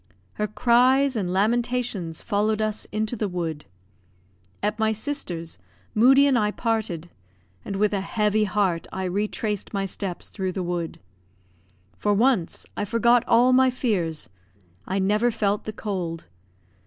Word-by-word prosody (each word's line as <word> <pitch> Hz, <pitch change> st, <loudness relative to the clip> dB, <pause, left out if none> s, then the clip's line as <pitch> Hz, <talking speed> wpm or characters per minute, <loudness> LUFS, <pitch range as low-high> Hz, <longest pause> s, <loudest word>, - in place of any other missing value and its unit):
Her 210 Hz, -, -2 dB
cries 255 Hz, +5 st, +3 dB
and 190 Hz, -5 st, -1 dB
lamentations 220 Hz, -4 st, 0 dB
followed 215 Hz, 0 st, +1 dB
us 215 Hz, 0 st, -1 dB
into 215 Hz, +2 st, -1 dB
the 210 Hz, -2 st, -1 dB
wood. 165 Hz, -5 st, -4 dB, 1.0 s
At 210 Hz, +2 st, -1 dB
my 220 Hz, 0 st, +2 dB
sister's, 190 Hz, -, -3 dB, 0.3 s
Moodie 265 Hz, +5 st, +6 dB
and 270 Hz, -4 st, +3 dB
I 210 Hz, -1 st, +2 dB
parted; 210 Hz, -7 st, -2 dB, 0.5 s
and 200 Hz, -, -5 dB
with 210 Hz, +1 st, +1 dB
a 195 Hz, -, 0 dB
heavy 210 Hz, +1 st, +1 dB
heart 190 Hz, -4 st, 0 dB
I 190 Hz, -, -4 dB
retraced 205 Hz, +2 st, -2 dB
my 195 Hz, 0 st, 0 dB
steps 190 Hz, -1 st, -4 dB
through 190 Hz, -2 st, -3 dB
the 185 Hz, -, -2 dB
wood. 175 Hz, -2 st, -3 dB, 1.0 s
For 205 Hz, -1 st, +1 dB
once, 225 Hz, -6 st, +1 dB
I -, -, -2 dB
forgot 235 Hz, +3 st, +3 dB
all 245 Hz, +2 st, +5 dB
my 260 Hz, 0 st, +5 dB
fears. 190 Hz, -, -1 dB, 0.6 s
I 190 Hz, -, -1 dB
never 210 Hz, +5 st, +2 dB
felt 210 Hz, -3 st, -1 dB
the 215 Hz, -, -3 dB
cold. 185 Hz, -6 st, -4 dB
210 Hz, 140 wpm, -24 LUFS, 190-230 Hz, 1.0 s, Moodie